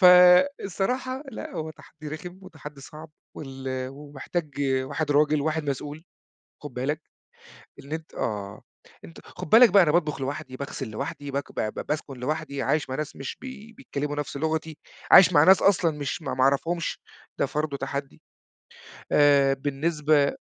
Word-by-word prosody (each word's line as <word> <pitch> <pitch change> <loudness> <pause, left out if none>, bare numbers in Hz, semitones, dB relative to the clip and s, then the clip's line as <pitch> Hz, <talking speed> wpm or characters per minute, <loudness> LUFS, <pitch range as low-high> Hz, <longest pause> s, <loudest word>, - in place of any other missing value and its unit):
فالصراحة 195 +7 +5
لأ، - - -7
هو 160 0 -4
تحدّي 155 -1 -12
رخم 175 +4 -8
وتحدّي 155 -6 -11
صعب، 155 +3 -11 0.3
وال 135 -2 -8 0.2
ومحتاج 145 +2 -6 0.3
واحد 150 +2 -3
راجل 150 +1 +3
وواحد 155 0 -1
مسؤول، 145 +4 -6 0.6
خُد 145 -4 -8
بالك 145 +5 -2 0.8
إن 140 - -11
أنت 160 0 -6
آه، 100 -3 -4 0.4
أنت 80 - -12
خُد - - -9
بالك 230 0 +8
بقى 195 +1 +7
أنا 160 - +3
باطبخ 155 -5 +1
لوحدي، 130 -1 -5
باغسل 140 -4 -5
لوحدي، 140 +5 -5
بك 140 0 -4
ب - - -3 0.2
ب - - -8
باسكن 150 -2 -3
لوحدي، 145 0 -3
عايش 150 -2 0
مع - - -2
ناس 150 0 -5
مش 135 - -6
بي 225 -4 -10
بيتكلّموا 145 - -5
نفس 145 -1 -4
لغتي، 160 +1 -2 0.3
عايش 180 0 +9
مع 145 -3 +6
ناس 190 +2 +6
أصلًا 170 -6 +3
مش 145 +3 -4
ما - - -3
ما 130 - 0
أعرفهُمش 165 +5 0 0.4
ده - - +2
فرضه 150 -1 -2
تحدّي 140 0 -5 0.9
آآ، 140 -2 +5
بالنسبة 145 +1 +1
150 Hz, 155 wpm, -26 LUFS, 140-170 Hz, 0.9 s, عايش